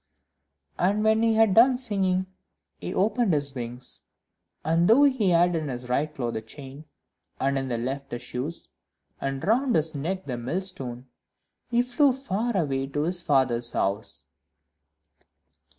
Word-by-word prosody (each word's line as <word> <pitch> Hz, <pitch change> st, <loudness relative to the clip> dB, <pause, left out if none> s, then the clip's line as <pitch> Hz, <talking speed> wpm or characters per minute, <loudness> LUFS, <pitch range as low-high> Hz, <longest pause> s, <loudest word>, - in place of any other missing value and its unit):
And 200 Hz, +4 st, +2 dB
when 220 Hz, 0 st, +3 dB
he 225 Hz, -1 st, +3 dB
had 220 Hz, -3 st, +4 dB
done 245 Hz, +4 st, +6 dB
singing, 195 Hz, -6 st, 0 dB, 0.5 s
he -, -, -5 dB
opened 210 Hz, -2 st, +2 dB
his 145 Hz, -1 st, -1 dB
wings, 125 Hz, -1 st, -6 dB, 0.6 s
and 165 Hz, +2 st, +3 dB
though 240 Hz, +6 st, +6 dB
he 260 Hz, -9 st, +3 dB
had 175 Hz, 0 st, +4 dB
in 155 Hz, -2 st, -2 dB
his 125 Hz, -2 st, -6 dB
right 145 Hz, +5 st, 0 dB
claw 125 Hz, -5 st, -3 dB
the 110 Hz, -, -4 dB
chain, 135 Hz, +5 st, -11 dB, 0.5 s
in 135 Hz, +1 st, +1 dB
his 130 Hz, -3 st, -2 dB
left 135 Hz, +2 st, -4 dB
the -, -, -4 dB
shoes, 125 Hz, +6 st, -6 dB, 0.5 s
and 135 Hz, 0 st, -3 dB
round 245 Hz, +4 st, +2 dB
his 160 Hz, 0 st, +1 dB
neck 180 Hz, +6 st, -3 dB
the 125 Hz, -3 st, -4 dB
millstone, 130 Hz, -4 st, -4 dB, 0.6 s
he 240 Hz, 0 st, +3 dB
flew 255 Hz, +2 st, +3 dB
far 240 Hz, -4 st, -2 dB
away 135 Hz, -5 st, 0 dB
to 145 Hz, +2 st, -2 dB
his 175 Hz, +2 st, +1 dB
father's 125 Hz, -6 st, +1 dB
house. 100 Hz, +3 st, -2 dB
160 Hz, 150 wpm, -26 LUFS, 135-215 Hz, 0.6 s, done